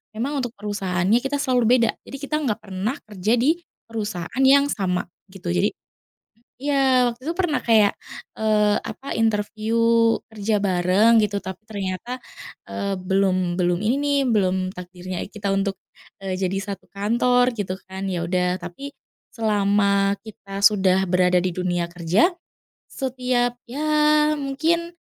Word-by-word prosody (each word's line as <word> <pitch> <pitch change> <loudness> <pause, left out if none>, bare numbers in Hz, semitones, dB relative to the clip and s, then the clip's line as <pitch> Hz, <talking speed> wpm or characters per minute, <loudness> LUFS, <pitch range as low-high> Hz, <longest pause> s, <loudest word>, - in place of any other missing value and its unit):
emang 275 +6 -2
untuk 245 -2 -4
perusahaannya 200 0 0
kita 270 +3 -2
selalu 255 -5 +1
beda, 235 -2 +3 0.2
jadi - - -8
kita 285 +2 -2
nggak 240 -9 -1
pernah 195 +6 -3 0.2
kerja 210 +4 +1
di 300 +8 +2 0.2
perusahaan 215 -1 -5
yang 280 +2 +5
sama, 180 -3 -1 0.2
gitu. 185 -2 -6
Jadi 180 +4 +1 0.9
iya 265 -3 +3
waktu 240 +3 -10
itu 330 - -1
pernah 345 -5 0
kayak, 220 -4 +3 0.4
eee, 210 -1 +3
apa 275 -2 -6
interview 220 0 0 0.5
kerja 210 -1 -1
bareng 195 +4 +4
gitu 205 -1 -3
tapi 190 -1 -6
ternyata, 205 +4 -5 0.5
eee, 195 -2 -3
belum 185 -2 +1
belum 175 0 +1
ini 230 +5 +1
nih 285 0 +1
belum 190 -4 +1
takdirnya 180 0 -6
kita 205 0 -5
untuk, 195 0 0 0.5
eee, 190 -1 -3
jadi 190 0 -1 0.2
1 - - -13
kantor 245 +5 +2
gitu 185 -2 -2 0.2
kan 190 +1 -5
ya 170 -1 -2
udah 180 0 0
tapi 280 +11 -8 0.4
selama 200 -2 +2
kita 200 -2 -8
sudah 190 -2 +4
berada 180 0 +3
di 185 - 0
dunia 175 -1 -2
kerja, 175 - +2 0.6
setiap 250 -2 -1
ya 275 +6 -4 0.6
mungkin, 330 +5 -1
210 Hz, 140 wpm, -23 LUFS, 185-250 Hz, 0.9 s, yang